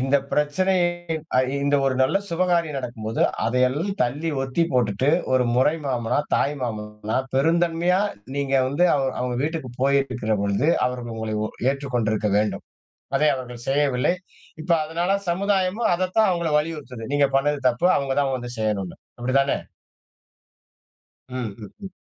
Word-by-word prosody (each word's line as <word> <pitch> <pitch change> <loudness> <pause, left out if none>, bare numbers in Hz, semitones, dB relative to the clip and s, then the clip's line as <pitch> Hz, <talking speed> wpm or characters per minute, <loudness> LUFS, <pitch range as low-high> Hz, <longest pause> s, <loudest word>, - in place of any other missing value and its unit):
இந்த 135 +2 +3 0.2
பிரச்சனை 165 +6 +1 0.9
இந்த 145 0 +3
ஒரு 135 - +1
நல்ல 135 +8 +2
சுபகாரியம் 170 -3 +1
நடக்கும்போது, 115 -3 -4 0.2
அதையெல்லாம் 130 - +1
தள்ளி 145 +7 -1
ஒத்திப்போட்டுட்டு, 130 -4 +1 0.2
ஒரு 130 -1 +4
முறை 130 +5 +3
மாமனா, 120 -3 0 0.2
தாய் 145 - +1
மாமனா 105 -2 -4 0.2
பெருந்தன்மையா 170 +5 +2 0.4
நீங்க 140 -1 -1
வந்து 155 +7 +3
அவ 140 - +1 0.2
அவங்க 125 -1 -1
வீட்டுக்குப் 145 -6 -4
போயிருக்கிற 135 -5 +1
பொழுது 100 +9 +1 0.2
அவர்கள் 125 -2 -4
உங்களை 110 -1 -3 0.4
ஏற்றுக் 140 -1 -5
கொண்டிருக்க 110 -2 0
வேண்டும். 105 0 -1 0.5
அதை 155 - +3
அவர்கள் 125 -2 -8
செய்யவில்லை. 135 +1 +2 0.5
இப்ப 170 - -9
அதனால 170 +4 -2 0.2
சமுதாயமும் 195 +3 +1
அதத்தான் 185 +5 +2
அவங்களை 170 -3 -1
வலியுறுத்துது. 150 -7 -5
நீங்கப் 140 -1 +2
பண்ணது 145 +2 +1
தப்பு. 125 +7 +1
அவங்க 140 -1 -1
தான் 135 -1 0
வந்து 120 0 -7
செய்யணும்னு. 105 -4 -2 0.2
அப்படித்தானே? 135 +3 +2 1.7
ம். 125 -5 -4
ம். 105 -3 -10
ம். 190 - -7
135 Hz, 130 wpm, -23 LUFS, 120-165 Hz, 1.7 s, ஒரு